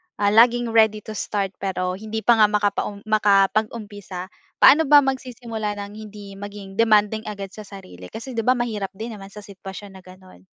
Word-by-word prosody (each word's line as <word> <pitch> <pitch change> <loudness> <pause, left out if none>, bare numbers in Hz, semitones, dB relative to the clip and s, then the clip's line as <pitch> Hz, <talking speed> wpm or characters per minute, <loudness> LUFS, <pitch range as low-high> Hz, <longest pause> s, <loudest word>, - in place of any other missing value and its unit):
ah, 205 0 +1
laging 235 +2 +4
ready 220 -2 +3
to - - -8
start, 200 -2 -3
pero, 185 -1 -2
hindi 220 +1 -5
pa 235 -2 +4
nga 215 - +7
makapaum 205 0 -1
makapag-umpisa, 205 -2 0 0.3
paano 300 +3 +6
ba 290 0 +7
magsisimula 240 -5 -4
ng 200 0 -10
hindi 205 -2 -10
maging 200 -1 -9
demanding 215 -1 +3
agad 200 -2 -6
sa 215 0 -11
sarili? 90 - -12
Kasi 230 - -8
'di 230 -2 -2
ba 250 +3 +2
mahirap 220 -5 -3
din 225 +4 -6
naman 195 -2 -10
sa 210 +1 -11
sitwasyon 195 0 -10
na - - -16
gano'n. 185 - -16
210 Hz, 175 wpm, -22 LUFS, 195-225 Hz, 0.3 s, nga